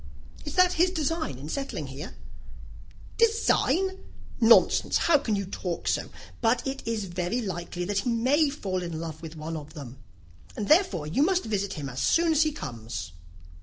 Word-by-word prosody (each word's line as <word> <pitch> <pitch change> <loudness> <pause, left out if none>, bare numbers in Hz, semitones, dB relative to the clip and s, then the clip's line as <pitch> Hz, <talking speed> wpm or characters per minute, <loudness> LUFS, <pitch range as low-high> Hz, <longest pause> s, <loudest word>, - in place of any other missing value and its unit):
"Is 295 - -5
that 365 0 +5
his 355 +2 +3
design 320 - -2
in 140 +3 -8
settling 270 - -4
here?" 140 +7 -8 1.0
"Design? 390 -4 +2 0.4
Nonsense, 230 -1 +5
how 320 -4 +4
can 220 -5 -1
you 200 -1 -2
talk 180 -2 -4
so! - - 0 0.3
But 240 +1 +2
it 270 0 -3
is 220 -3 -1
very 180 +5 -2
likely 175 -4 -4
that 200 +1 0
he 220 - -2
may 265 +6 +3
fall 195 -10 -3
in 170 -3 -4
love 160 -1 -6
with 165 -1 -8
one 160 +1 -5
of 155 +1 -8
them, 135 -4 -9 0.6
and 210 - -3
therefore 300 - +3
you 160 - 0
must 365 +4 +3
visit 200 -3 -1
him 145 -3 -5
as 130 -1 -6
soon 330 - +3
as 310 -1 +3
he 310 -1 +3
comes." 110 - -6
205 Hz, 175 wpm, -27 LUFS, -, 1.0 s, that